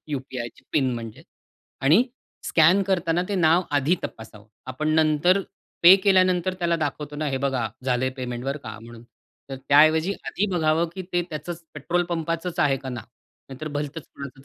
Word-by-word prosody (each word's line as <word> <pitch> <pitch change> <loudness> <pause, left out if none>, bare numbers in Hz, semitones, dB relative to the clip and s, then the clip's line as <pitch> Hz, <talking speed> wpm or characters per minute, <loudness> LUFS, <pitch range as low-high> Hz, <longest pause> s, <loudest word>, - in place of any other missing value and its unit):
यू-पी-आयची 130 -4 -6
pin 135 -4 +2
म्हणजे 115 -2 -8 0.6
आणि 155 - +5 0.4
scan 170 +5 +4
करतांना 175 -3 0
ते 205 - -2
नाव 170 0 +4
आधी 145 +4 +2
तपासावं. 110 -2 -9 0.2
आपण 130 +4 -3
नंतर 160 +4 +3 0.4
पे 175 +2 +10
केल्यानंतर 185 -2 +2
त्याला 170 -1 +1
दाखवतो 150 -1 -4
ना, 155 +1 -2
"हे 135 - -1
बघा 130 -4 -1 0.2
झालंय 130 0 0
पेमेंट, 125 -1 -5
बरं 140 +2 -2
का 110 0 -8
म्हणून." 115 0 -12 0.5
तर 135 - -4
त्याऐवजी 155 +5 +5
आधी 205 - -1
बघावं, 160 0 +2
की 190 - -5
ते 175 - +2
त्याच 155 +1 -7 0.3
पेट्रोल 170 +4 -1
पंपाचंच 165 +1 -3
आहे 140 -2 +3
का 135 0 -8
नाव? 120 -4 -6 0.4
नाहीतर 135 +4 -7
भलतंच 145 +1 -5
कुणाचं 140 -1 -10
155 Hz, 160 wpm, -24 LUFS, 135-170 Hz, 0.6 s, पे